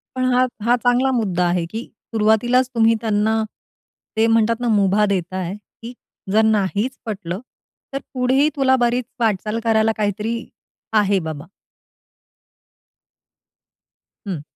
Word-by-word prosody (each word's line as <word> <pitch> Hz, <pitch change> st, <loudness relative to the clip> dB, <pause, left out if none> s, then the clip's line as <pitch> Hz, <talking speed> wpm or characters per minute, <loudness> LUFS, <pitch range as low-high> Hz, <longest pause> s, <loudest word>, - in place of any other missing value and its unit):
पण 255 Hz, -, -1 dB
हा- 250 Hz, +1 st, +4 dB, 0.2 s
हा 240 Hz, +2 st, +4 dB
चांगला 250 Hz, +2 st, +3 dB
मुद्दा 195 Hz, -8 st, 0 dB
आहे 175 Hz, -1 st, 0 dB
की 225 Hz, +2 st, -4 dB, 0.3 s
सुरुवातीलाच 225 Hz, +4 st, +3 dB
तुम्ही 225 Hz, 0 st, +4 dB
त्यांना 220 Hz, 0 st, +1 dB, 0.7 s
ते 220 Hz, -, +4 dB
म्हणतात 225 Hz, 0 st, +2 dB
ना 245 Hz, -, -2 dB
मुभा 205 Hz, -1 st, +3 dB
देताय. 185 Hz, -1 st, -2 dB
की 225 Hz, +4 st, -12 dB, 0.4 s
जर 215 Hz, +2 st, +4 dB
नाहीच 215 Hz, +4 st, 0 dB
पटलं 195 Hz, -4 st, -4 dB, 0.5 s
तर 275 Hz, -, -1 dB
पुढेही 265 Hz, +3 st, +2 dB
तुला 265 Hz, -2 st, +3 dB
बरीच 240 Hz, +1 st, 0 dB
वाटचाल 215 Hz, 0 st, 0 dB
करायला 225 Hz, -1 st, +3 dB
काहीतरी 210 Hz, +2 st, -1 dB, 0.6 s
आहे 205 Hz, -2 st, +3 dB
बाबा. 160 Hz, -4 st, -6 dB, 2.8 s
हं. 180 Hz, -7 st, -3 dB
220 Hz, 120 wpm, -20 LUFS, 200-240 Hz, 2.8 s, हा